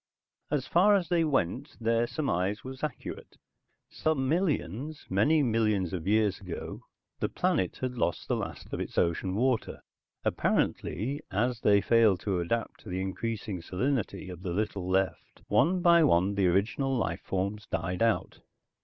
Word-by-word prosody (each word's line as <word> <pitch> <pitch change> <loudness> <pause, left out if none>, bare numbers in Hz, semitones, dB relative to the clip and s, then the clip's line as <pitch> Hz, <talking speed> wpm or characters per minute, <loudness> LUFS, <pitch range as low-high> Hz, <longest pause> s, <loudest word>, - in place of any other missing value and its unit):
As 140 -3 0
far 195 +8 +5
as 180 -5 0
they 170 -2 +3
went, 135 - -1
their 115 +1 +2
surmise 105 - -1
was 130 +1 -8
accurate. 150 -4 -6 0.5
Some 145 -4 0
millions, 150 - -1
many 145 +11 +4
millions 110 -7 +1
of 90 -1 -4
years 105 -2 +2
ago, 90 -4 -6 0.4
the - - 0
planet 95 -2 0
had 125 -2 -3
lost 85 - -1
the - - +1
last - - -6
of - - -2
its - - -5
ocean 90 +3 +1
water. 125 +1 0 0.4
Apparently, 135 - 0
as 120 +4 0
they 100 -1 +5
failed 110 -5 +4
to 95 -4 -1
adapt 115 +7 -2
to - - -11
the 90 +1 -2
increasing 100 0 -3
salinity 105 +5 -2
of 90 -2 -8
the 90 -2 -3
little 100 -2 -2
left, 95 0 -1
one 175 - +3
by 170 -1 +6
one 95 - +3
the 100 -2 +2
original 115 +9 +1
life 85 -7 -1
forms 100 +3 -3
died 85 +3 -2
out. 115 -1 +1
110 Hz, 155 wpm, -29 LUFS, 95-135 Hz, 0.5 s, by